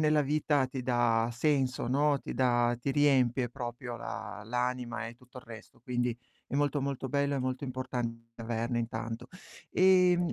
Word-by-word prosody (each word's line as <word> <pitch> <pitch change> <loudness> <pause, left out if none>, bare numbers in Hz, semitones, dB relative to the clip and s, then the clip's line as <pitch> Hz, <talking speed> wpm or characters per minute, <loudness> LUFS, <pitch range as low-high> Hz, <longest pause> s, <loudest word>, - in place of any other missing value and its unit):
nella 155 -1 +4
vita 145 -1 +2
ti 130 0 -5
dà 120 -2 +2
senso, 130 -1 +1
no, 140 +3 +3
ti - - -6
dà 120 -1 +2
ti 135 - -1
riempie 130 -4 +3
proprio 120 -1 -6
la 105 -1 -6
l'anima 125 0 -2
e 115 - -8
tutto 125 +1 -14
il - - -13
resto, 115 -2 -12
quindi 120 0 -1 0.3
è - - -6
molto, 145 0 +1
molto 135 -1 -3
bello 140 +1 +1
e - - 0
molto 130 +1 -2
importante 120 -3 -4
averne 115 +1 -1
intanto. 115 0 -4 0.4
Ehm, 180 -2 +4
125 Hz, 165 wpm, -31 LUFS, 120-140 Hz, 0.4 s, nella